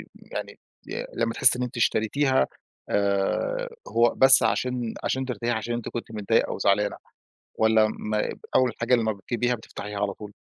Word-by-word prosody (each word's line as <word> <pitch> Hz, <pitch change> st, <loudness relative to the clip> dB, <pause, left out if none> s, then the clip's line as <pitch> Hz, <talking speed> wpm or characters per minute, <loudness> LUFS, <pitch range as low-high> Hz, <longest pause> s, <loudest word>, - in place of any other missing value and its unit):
يعني -, -, -8 dB, 0.3 s
ي -, -, -4 dB
لمّا 115 Hz, 0 st, -1 dB
تحسّي 125 Hz, +1 st, +5 dB
إن -, -, 0 dB
أنتِ 125 Hz, 0 st, -6 dB
اشتريتيها 130 Hz, +4 st, +1 dB, 0.4 s
آآ 100 Hz, -, 0 dB, 0.2 s
هو 115 Hz, 0 st, +2 dB
بس 135 Hz, 0 st, +8 dB
علشان 125 Hz, -2 st, -1 dB
علشان 130 Hz, 0 st, -1 dB
ترتاحي، 120 Hz, -1 st, -3 dB
علشان 110 Hz, +1 st, -3 dB
أنتِ 120 Hz, -1 st, -4 dB
كنتِ 120 Hz, -1 st, -6 dB
متضايقة 105 Hz, -3 st, +1 dB
أو -, -, -5 dB
زعلانة، 100 Hz, +1 st, +1 dB, 0.6 s
والّا 110 Hz, -1 st, +4 dB
ما 105 Hz, 0 st, -2 dB, 0.3 s
أول 130 Hz, -2 st, +3 dB
حاجة 115 Hz, +2 st, +3 dB
لمّا 110 Hz, -2 st, +1 dB
بتجيبيها 120 Hz, +5 st, -2 dB
بتفتحيها 105 Hz, -2 st, -8 dB
على 100 Hz, -1 st, 0 dB
طول؟ 105 Hz, -1 st, -10 dB
115 Hz, 160 wpm, -25 LUFS, 105-125 Hz, 0.6 s, بس